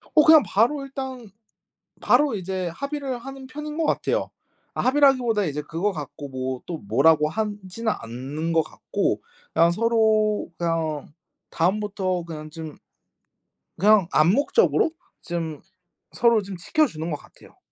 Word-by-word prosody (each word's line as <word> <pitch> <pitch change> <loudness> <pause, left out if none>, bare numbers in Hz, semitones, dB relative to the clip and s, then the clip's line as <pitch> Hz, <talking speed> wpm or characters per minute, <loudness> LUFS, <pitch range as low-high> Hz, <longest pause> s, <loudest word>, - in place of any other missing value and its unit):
어 305 - +7
그냥 315 -2 +8
바로 235 +10 +2
일단 265 -4 -7 0.7
바로 270 -1 +3
이제 185 -1 -3
합의를 280 -3 -3
하는 270 +1 -9
편인 300 +3 -7
거 325 - +1
같아요. - - 0 0.4
아 - - -2
합의라기보다 255 -6 +3
이제 150 -2 -3
그거 165 +7 -2
갖고 145 -3 -7
뭐 130 -1 -4
또 170 - -4
뭐라고 150 +7 +3
하지는 210 +2 -3
않는 135 +8 -4
거 165 - +4
같고 - - -2 0.3
그냥 165 +1 +4
서로 215 0 +2
그냥 165 -3 -1 0.4
다음부터 190 0 0
그냥 155 -2 -8
좀 155 -1 -8 1.0
그냥 200 -1 +5
암묵적으로 275 - +3 0.3
좀 165 -4 -4 0.5
서로 230 -2 +3
좀 195 -1 -7
지켜 300 - +2
주는 160 - -5
거 150 - -1
같아요. - - -19
195 Hz, 270 characters per minute, -24 LUFS, 160-245 Hz, 1.0 s, 그냥